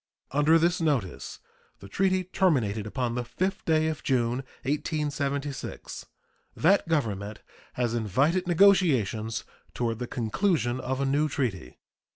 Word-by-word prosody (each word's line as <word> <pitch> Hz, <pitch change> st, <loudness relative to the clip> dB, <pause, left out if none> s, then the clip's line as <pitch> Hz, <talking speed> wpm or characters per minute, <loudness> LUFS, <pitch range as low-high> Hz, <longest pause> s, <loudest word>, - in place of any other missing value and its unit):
Under 150 Hz, +3 st, +4 dB
this 175 Hz, +2 st, +1 dB
notice 135 Hz, -, -1 dB, 0.4 s
the 100 Hz, -, -12 dB
treaty 185 Hz, -, +1 dB
terminated 125 Hz, -, +1 dB
upon 120 Hz, +1 st, -2 dB
the 125 Hz, -, -1 dB
5th 185 Hz, +12 st, -3 dB
day 155 Hz, -1 st, +3 dB
of 155 Hz, -1 st, -3 dB
June, 125 Hz, 0 st, 0 dB, 0.2 s
1876. 140 Hz, -1 st, -3 dB, 0.5 s
That 185 Hz, +3 st, +3 dB
Government 105 Hz, -10 st, -2 dB, 0.3 s
has 120 Hz, -2 st, -1 dB
invited 140 Hz, -, +1 dB
negotiations 140 Hz, -, +3 dB, 0.3 s
toward 115 Hz, -2 st, -1 dB
the 125 Hz, -, -4 dB
conclusion 125 Hz, -, 0 dB
of 130 Hz, +1 st, -2 dB
a -, -, +1 dB
new 145 Hz, +3 st, +1 dB
treaty. 100 Hz, -, -3 dB
140 Hz, 125 wpm, -27 LUFS, 115-160 Hz, 0.5 s, Under